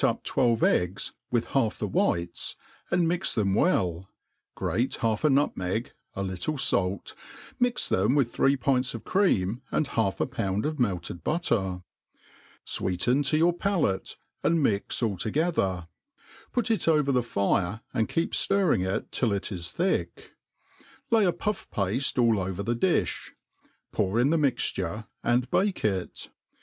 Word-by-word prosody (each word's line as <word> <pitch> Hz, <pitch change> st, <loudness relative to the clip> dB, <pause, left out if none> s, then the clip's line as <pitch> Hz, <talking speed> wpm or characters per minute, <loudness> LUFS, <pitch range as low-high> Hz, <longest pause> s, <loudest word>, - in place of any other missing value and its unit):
up -, -, +1 dB
twelve 120 Hz, -3 st, +2 dB
e^gs 90 Hz, +3 st, +1 dB, 0.2 s
with 120 Hz, -2 st, +1 dB
half 115 Hz, -6 st, +1 dB
the -, -, -2 dB
whites, 85 Hz, 0 st, -1 dB, 0.3 s
and 175 Hz, -1 st, +2 dB
mix 175 Hz, +2 st, 0 dB
them 100 Hz, -4 st, +1 dB
well, 95 Hz, -, +1 dB, 0.5 s
grate 125 Hz, +3 st, -1 dB
half 110 Hz, -2 st, 0 dB
a 155 Hz, -, +5 dB
nutmeg, 115 Hz, -6 st, 0 dB, 0.2 s
a 95 Hz, -, -2 dB
little 95 Hz, -, -3 dB
falt^ 100 Hz, -8 st, +1 dB, 0.5 s
mix 245 Hz, 0 st, +1 dB
them 105 Hz, +8 st, +2 dB
with 130 Hz, -5 st, +1 dB
three 140 Hz, +1 st, +3 dB
pints 130 Hz, -1 st, +1 dB
of 115 Hz, -, -7 dB
cre^im 125 Hz, -, +1 dB
mi -, -, +2 dB
half 100 Hz, -4 st, 0 dB
a -, -, +2 dB
ppuad 105 Hz, -4 st, -2 dB
of 155 Hz, -1 st, -2 dB
melted 90 Hz, -7 st, -2 dB
butter; 95 Hz, -, 0 dB, 0.8 s
fweeten 110 Hz, +10 st, 0 dB
to 155 Hz, +2 st, +2 dB
your 170 Hz, +2 st, +4 dB
palate, 175 Hz, -, -1 dB, 0.2 s
and 165 Hz, -2 st, +2 dB
mix 105 Hz, +1 st, 0 dB
all 105 Hz, -4 st, 0 dB
together; 100 Hz, -, 0 dB, 0.6 s
put 245 Hz, -1 st, 0 dB
it 220 Hz, -, 0 dB
over 150 Hz, -3 st, +3 dB
the 125 Hz, -2 st, +3 dB
fire, 100 Hz, -2 st, 0 dB
and 110 Hz, -4 st, 0 dB
keep 165 Hz, -, 0 dB
birring 190 Hz, -, +2 dB
it 95 Hz, +1 st, -2 dB
till 120 Hz, -4 st, 0 dB
it 100 Hz, +2 st, -2 dB
is 85 Hz, -3 st, -4 dB
thick. 185 Hz, +3 st, -2 dB, 0.8 s
Lay 225 Hz, -3 st, +5 dB
a 180 Hz, -, +4 dB
puff 210 Hz, +3 st, -3 dB
pafte 105 Hz, +9 st, -1 dB
all 115 Hz, -3 st, +4 dB
over 95 Hz, +1 st, -3 dB
the 120 Hz, +2 st, 0 dB
difli^ 170 Hz, +9 st, 0 dB, 0.6 s
ppur 95 Hz, -2 st, 0 dB
jn 120 Hz, +6 st, +3 dB
the 165 Hz, -, +3 dB
mixture, 110 Hz, -, -1 dB, 0.2 s
and 120 Hz, +1 st, +1 dB
bake 195 Hz, -, +1 dB
it. 95 Hz, -4 st, -2 dB
115 Hz, 155 wpm, -27 LUFS, 95-155 Hz, 0.8 s, a